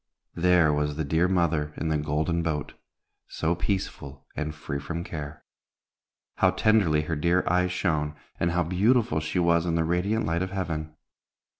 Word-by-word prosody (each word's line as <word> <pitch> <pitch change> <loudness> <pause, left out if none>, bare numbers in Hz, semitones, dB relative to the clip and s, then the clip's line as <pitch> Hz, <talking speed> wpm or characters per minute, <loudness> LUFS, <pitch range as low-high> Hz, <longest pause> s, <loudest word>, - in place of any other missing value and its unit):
there 85 -3 +4
was 75 0 0
the 80 - -2
dear 80 +5 +2
mother 80 -5 0
in 80 - -2
the 80 - +2
Golden 75 +3 0
Boat, 75 -4 -2 0.5
so 80 +1 -1
peaceful 85 -6 -4
and 75 0 -3
free 70 -2 -4
from 85 +4 -4
care. 75 -3 -7 0.9
How - - +4
tenderly 100 -9 +3
her 80 +1 -2
dear 85 +4 +2
eyes 90 0 +2
shone, 75 -5 -1 0.2
and 85 - +1
how 90 +1 +1
beautiful 95 +1 +2
she 80 +3 -3
was 85 -1 +3
in 85 - +1
the 80 - +2
radiant 95 +7 0
light 85 +1 0
of 95 - -1
heaven! 80 -5 -4
85 Hz, 165 wpm, -26 LUFS, 75-90 Hz, 0.9 s, there